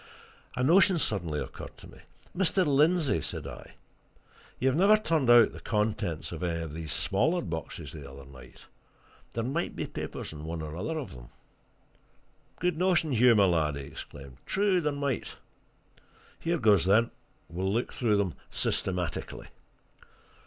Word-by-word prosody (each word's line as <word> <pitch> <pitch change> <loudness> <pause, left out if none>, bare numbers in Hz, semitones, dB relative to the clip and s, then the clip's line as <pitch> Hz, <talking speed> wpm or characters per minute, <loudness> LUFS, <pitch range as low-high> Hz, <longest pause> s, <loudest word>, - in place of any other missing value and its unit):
A 125 - -1
notion 185 +5 +5
suddenly 85 - -1
occurred - - -8
to - - -12
me. - - -15 0.4
"Mr. 190 0 +2
Lindsey," 150 - +3
said - - -5
I, - - -10 0.8
"you 130 +2 +2
never 200 +8 +5
turned 160 - +1
out 120 -2 +7
the - - -10
contents 105 -6 -1
of - - -6
any 85 -2 -1
of 80 -2 -7
these 80 -1 -5
smaller 160 - +1
boxes 80 - -5
the 70 -3 -9
other 70 0 -11
night. 65 -2 -14 0.7
There 115 - -2
might 140 +8 -2
be - - -3
papers - - -6
in 75 -1 -8
one 80 0 -4
or 75 0 -6
other 160 - -3
of 140 - -5
them." - - -12 1.3
"Good 180 -2 0
notion, 180 -4 +2
Hugh, 125 -1 +5
my 100 -2 +5
lad!" 80 -5 +1
he 70 - -5
exclaimed. 70 -1 -10
"True 195 -2 +2
there 150 -2 0
might. 140 -3 -3 1.0
Here 170 +1 0
goes, 105 - +4
then 110 +5 +4 0.4
we'll 95 +3 -2
look 115 +4 -1
through 115 -7 +2
them 100 -5 0 0.2
systematically." 90 -4 -2
110 Hz, 155 wpm, -29 LUFS, -, 1.3 s, out